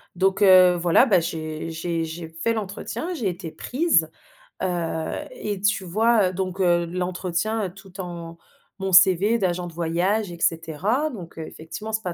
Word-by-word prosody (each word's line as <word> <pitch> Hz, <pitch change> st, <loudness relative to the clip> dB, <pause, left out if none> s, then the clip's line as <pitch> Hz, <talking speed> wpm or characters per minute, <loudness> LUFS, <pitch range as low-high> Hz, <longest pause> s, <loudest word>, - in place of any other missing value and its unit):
donc 190 Hz, +2 st, +1 dB
heu, 185 Hz, -2 st, +7 dB
voilà, 175 Hz, +8 st, +4 dB
bah, 195 Hz, -8 st, +4 dB
j'ai 155 Hz, 0 st, -4 dB
j'ai 165 Hz, 0 st, -2 dB
j'ai 160 Hz, +1 st, -7 dB
fait 165 Hz, +8 st, -1 dB
l'entretien, 220 Hz, -, -4 dB
j'ai 230 Hz, -, -1 dB
été 170 Hz, -2 st, -6 dB
prise, 250 Hz, -, +1 dB, 0.5 s
heu 185 Hz, -, +1 dB, 0.6 s
et 210 Hz, -, -5 dB
tu 205 Hz, -2 st, +1 dB
vois, 215 Hz, +1 st, +3 dB
heu, -, -, -7 dB
donc 185 Hz, 0 st, -3 dB
heu, 175 Hz, -1 st, +3 dB
l'entretien 185 Hz, +4 st, -2 dB
tout 190 Hz, +1 st, -15 dB
en 170 Hz, -2 st, -7 dB, 0.4 s
mon 190 Hz, 0 st, -2 dB
CV 190 Hz, +5 st, +6 dB
d'agent 180 Hz, -2 st, -1 dB
de 170 Hz, -, -10 dB
voyage 175 Hz, +5 st, 0 dB
et 170 Hz, -, -9 dB
cetera, 170 Hz, -, 0 dB
donc, 180 Hz, -, -10 dB
heu, 160 Hz, -, -5 dB
effectivement 165 Hz, +7 st, -8 dB
c'est 220 Hz, -, -1 dB
pas 180 Hz, -3 st, -3 dB
180 Hz, 170 wpm, -24 LUFS, 170-205 Hz, 0.6 s, heu